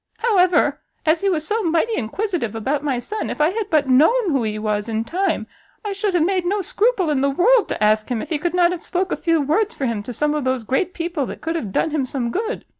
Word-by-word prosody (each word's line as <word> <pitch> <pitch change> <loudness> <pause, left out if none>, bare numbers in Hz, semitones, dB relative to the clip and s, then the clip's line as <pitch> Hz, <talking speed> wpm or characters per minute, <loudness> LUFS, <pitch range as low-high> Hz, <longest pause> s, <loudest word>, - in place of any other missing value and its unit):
However, 370 -6 +3 0.3
as 320 +1 +3
he 395 - +2
was 315 -4 -1
so 440 +5 -1
mighty 340 +5 +1
inquisitive 310 - -2
about 270 +6 -1
my 275 -4 0
son, 420 - -4
if - - -5
I 300 +1 +4
had 425 0 -3
but 300 -3 +2
known 335 - +4
who 270 -3 +1
he 215 -1 -2
was 210 0 -2
in 220 0 -1
time, 350 - -1 0.4
I 410 - -2
should 395 -1 -1
have 325 -2 +3
made 370 0 +1
no 395 +4 0
scruple 405 -3 +1
in 275 -3 +1
the 280 - +2
world 425 - +3
to - - -2
ask 215 +2 +2
him 245 -3 -1
if - - -7
he 305 - 0
could 345 +3 -2
not 350 -1 +4
have 355 -2 -4
spoke 370 +1 -2
a - - +1
few 330 -2 +1
words 365 +11 0
for 275 - -2
him 230 -4 -1
to 225 - -7
some 295 +5 0
of 300 -2 -1
those 260 -2 -1
great 270 - -1
people 335 -5 -2
that - - -8
could 325 +1 -2
have 220 -12 -3
done 320 - 0
him 285 -4 -1
some 245 -3 -3
good. 445 - -3
320 Hz, 265 wpm, -21 LUFS, 260-380 Hz, 0.4 s, I